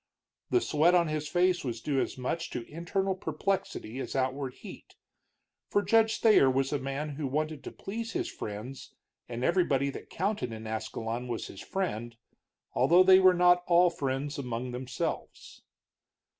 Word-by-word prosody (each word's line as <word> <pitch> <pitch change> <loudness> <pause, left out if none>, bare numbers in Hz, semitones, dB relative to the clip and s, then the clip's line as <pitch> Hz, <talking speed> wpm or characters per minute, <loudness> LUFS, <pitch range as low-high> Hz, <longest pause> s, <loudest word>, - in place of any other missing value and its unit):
The 365 - +3
sweat 165 - +3
on 170 -2 +3
his 155 -1 -2
face 180 +2 +2
was 120 -4 -3
due 135 +2 0
as - - -3
much 165 +6 -3
to 120 -2 -5
internal 190 +4 -1
perplexity 185 - -3
as - - -5
outward 130 0 -1
heat, - - -12 0.7
for 205 - +2
Judge 225 0 +3
Thayer 215 - +6
was 135 +2 0
a 145 - 0
man 135 +3 -3
who 150 -3 -2
wanted 155 +1 -2
to - - -5
please 230 +3 -6
his 360 0 -1
friends, 115 - -7 0.3
and 120 0 -4
everybody 140 -5 +2
that - - -10
counted 185 - -2
in 110 0 -8
Ascalon 115 +2 -4
was 120 -2 -3
his 95 - -9
friend, 120 - -3 0.6
although 175 +2 +5
they 190 0 +7
were 185 -1 +6
not 175 0 +5
all 175 0 +5
friends 140 -2 -3
among 125 -1 -4
themselves. 125 +1 -5
150 Hz, 160 wpm, -29 LUFS, 130-180 Hz, 0.7 s, they